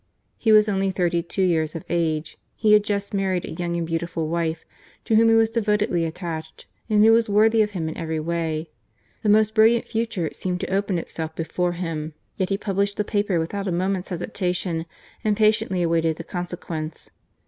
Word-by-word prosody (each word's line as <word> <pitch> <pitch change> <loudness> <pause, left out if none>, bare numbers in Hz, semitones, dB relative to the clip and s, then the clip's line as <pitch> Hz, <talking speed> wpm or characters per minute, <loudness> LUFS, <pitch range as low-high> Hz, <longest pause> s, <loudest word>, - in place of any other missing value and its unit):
He 220 - +2
was 215 0 +6
only 195 -1 +1
thirty 175 -2 0
two 185 +3 -2
years 165 -3 +1
of 165 - -6
age, 160 -2 -1 0.2
he 215 -1 +3
had 210 -1 +6
just 200 -1 -2
married 190 -3 0
a - - -7
young 170 +1 -3
and 170 - -1
beautiful 165 -1 -2
wife, 165 0 -2 0.4
to 225 - +2
whom 225 +1 +6
he 225 - +5
was 225 0 +4
devotedly 210 -5 +1
attached, 160 -1 -6 0.2
and 210 0 +5
who 225 - +7
was 225 -1 +3
worthy 220 +2 +4
of 210 - +2
him 160 -2 -2
in 160 - -4
every 160 -2 -3
way: 160 -1 -2 0.5
the 215 - 0
most 215 +1 +4
brilliant 225 +1 +4
future 225 -8 -2
seenied 180 -1 -3
to - - -3
open 195 -2 0
itself 160 -1 -5
before 175 +2 -1
him. 160 -3 -4 0.2
Yet 185 - -1
he 195 - +1
published 200 0 -1
the 210 - +1
paper 205 -3 0
without 195 +5 -2
a - - 0
moment's 185 +2 -1
hesitation 180 -1 -2 0.4
and 210 -1 +1
patiently 215 -4 +2
awaited 165 -1 +1
the 165 - -6
consequence. 170 -3 -6
180 Hz, 190 wpm, -23 LUFS, 165-210 Hz, 0.5 s, who